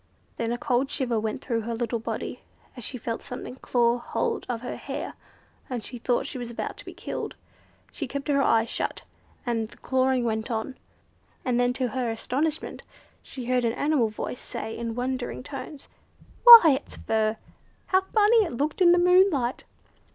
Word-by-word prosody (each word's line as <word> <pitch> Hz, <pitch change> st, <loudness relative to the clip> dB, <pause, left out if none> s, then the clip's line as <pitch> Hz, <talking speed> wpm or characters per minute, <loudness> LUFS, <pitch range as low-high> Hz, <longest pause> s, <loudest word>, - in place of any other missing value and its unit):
Then 230 Hz, 0 st, -1 dB
a 240 Hz, -, -1 dB
cold 250 Hz, +3 st, 0 dB
shiver 245 Hz, -6 st, 0 dB
went 220 Hz, +3 st, -3 dB
through 230 Hz, -2 st, -1 dB
her 230 Hz, +1 st, -3 dB
little 235 Hz, 0 st, -2 dB
body, 225 Hz, -, -5 dB, 0.3 s
as 245 Hz, -, -8 dB
she 250 Hz, -, -4 dB
felt 230 Hz, -1 st, -4 dB
something 250 Hz, +1 st, -7 dB
claw 240 Hz, -2 st, +1 dB
hold 455 Hz, -, -2 dB
of 235 Hz, -2 st, -2 dB
her 250 Hz, -, -5 dB
hair, -, -, -5 dB, 0.6 s
and 245 Hz, -4 st, -3 dB
she 245 Hz, -, -8 dB
thought 240 Hz, +1 st, 0 dB
she 255 Hz, -, -6 dB
was 240 Hz, -1 st, -5 dB
about 235 Hz, -, -4 dB
to -, -, -10 dB
be -, -, -8 dB
killed. -, -, -5 dB, 0.6 s
She 290 Hz, -, -4 dB
kept 280 Hz, +3 st, -5 dB
her 280 Hz, -1 st, +3 dB
eyes 225 Hz, -3 st, +3 dB
shut, -, -, -3 dB, 0.4 s
and 225 Hz, -3 st, -1 dB
the -, -, -16 dB
clawing 260 Hz, -1 st, +1 dB
went 220 Hz, 0 st, -2 dB
on, 230 Hz, +3 st, -3 dB, 0.7 s
and 245 Hz, -2 st, +1 dB
then 245 Hz, 0 st, +3 dB
to 255 Hz, -1 st, -1 dB
her 250 Hz, -1 st, -2 dB
astonishment 280 Hz, +7 st, -2 dB, 0.4 s
she 255 Hz, -3 st, -8 dB
heard 250 Hz, 0 st, +1 dB
an 230 Hz, -1 st, +1 dB
animal 285 Hz, -5 st, +1 dB
voice 215 Hz, +3 st, -5 dB
say 220 Hz, 0 st, -6 dB
in 230 Hz, -1 st, -4 dB
wondering 250 Hz, 0 st, -3 dB
tones: 275 Hz, +1 st, -8 dB, 0.6 s
"Why, 360 Hz, -, +11 dB
it's -, -, -9 dB
fur! 220 Hz, 0 st, 0 dB, 0.5 s
How 375 Hz, 0 st, +3 dB
funny 425 Hz, +3 st, +3 dB
it 340 Hz, -, -4 dB
looked 300 Hz, +7 st, -1 dB
in 350 Hz, -1 st, +7 dB
the -, -, +4 dB
moonlight!" 355 Hz, -8 st, +3 dB
250 Hz, 180 wpm, -26 LUFS, 235-280 Hz, 0.7 s, Why